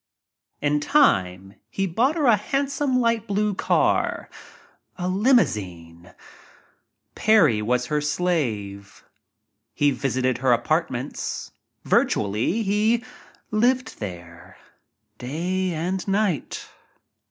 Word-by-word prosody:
In 150 0 +1
time 95 - +2 0.2
he 195 +12 -2
bought 235 - +1
her 310 -4 0
a 235 -4 +6
handsome 275 +4 -1
light 230 -2 0
blife 205 0 0
car - - 0 0.7
a 180 -1 -3
limousine. 95 - 0 1.0
Parry 175 - +3
was 125 +3 0
her 150 -1 -1
slave. 120 - -2 0.7
He 145 -1 +3
visited 130 -2 -1
her 130 -1 +3
apartments. 145 -1 -2 0.3
Virtually 110 - +1
he 215 +4 +1 0.5
lived 245 +4 +1
there 90 -2 -9 0.3
— 105 0 -52
day 180 +8 -2
and 175 +4 -3
night. 195 -5 -1
155 Hz, 95 wpm, -23 LUFS, -, 1.0 s, a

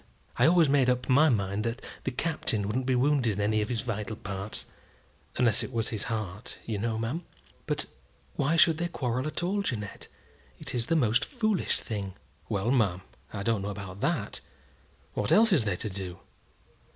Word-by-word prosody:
I 125 - +5
always 170 -1 +6
made 135 -2 +4
up 125 0 +1
my 145 +5 +6
mind 100 -3 0
that 115 +2 -2 0.3
the - - +1
Captain 130 -7 -1
wouldn't 125 +5 -1
be 130 - +3
wounded 130 -3 +3
in 100 - -5
any 105 +1 +2
of 105 - -2
his 120 -1 -1
wital 110 -2 -3
parts 100 +1 -3 0.7
unless 120 -4 +3
it - - -4
was 115 -2 0
his 110 -2 -3
heart, 110 -1 -4
you 110 -3 -2
know, 110 +1 -1
ma'am." 120 +10 -2 0.4
"But - - -1 0.5
why 145 +3 +2
should 165 -2 +5
they 175 - 0
quarrel 130 -4 -2
at 155 - -2
all, 200 +3 +1
Jeannette? 110 - -4 0.5
It - - -6
is 120 -2 -1
the 165 - +2
most 120 -3 +3
foolish 215 - 0
thing." 100 -4 -4 0.3
"Well, 105 +2 0
ma'am, 100 -9 +2 0.3
I 100 - -4
don't 115 -2 +1
know 100 - -3
about 100 -1 -7
that. - - -1 0.7
What 105 - -1
else 225 -1 +6
is 135 -11 +4
they 100 -3 +1
to 105 +4 -2
do? 95 -2 -5
115 Hz, 190 wpm, -29 LUFS, 105-140 Hz, 0.7 s, always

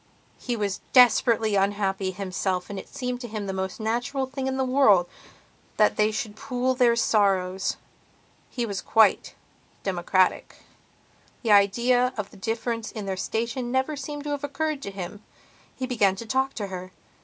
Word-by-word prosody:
He 245 - -2
was 205 -3 -2
desperately 230 -3 +5
unhappy 195 -1 0
himself 185 0 -3
and 200 - -4
it - - -11
seemed 250 -2 -4
to 240 - -5
him 215 -2 -5
the 195 - -3
most 190 +1 -4
natural 240 +5 -1
thing 265 0 -4
in 265 0 -1
the 265 - +1
world 235 -9 +4 0.7
that 210 - +4
they 210 0 +3
should 220 -1 -4
pool 250 +3 -1
their 245 -2 +3
sorrows. 195 -5 +1 0.7
He 240 -2 -2
was 200 -3 -4
quite 220 -3 +3 0.5
democratic; 185 0 +1 0.9
the 225 - +1
idea 245 +5 +4
of 205 -2 -4
the - - -15
difference 225 +2 -3
in 215 -3 -6
their 190 -1 -2
station 235 +5 -3
never 265 +4 0
seems 290 +1 -6
to 295 - -4
have 290 -1 -3
occurred 300 0 -2
to 200 - -5
him. 195 +1 -7 0.5
He 260 - -3
began 215 -7 +2
to 230 - -7
talk 265 +4 0
to 210 - -3
her. 185 -1 -7
220 Hz, 165 wpm, -25 LUFS, 195-255 Hz, 0.9 s, desperately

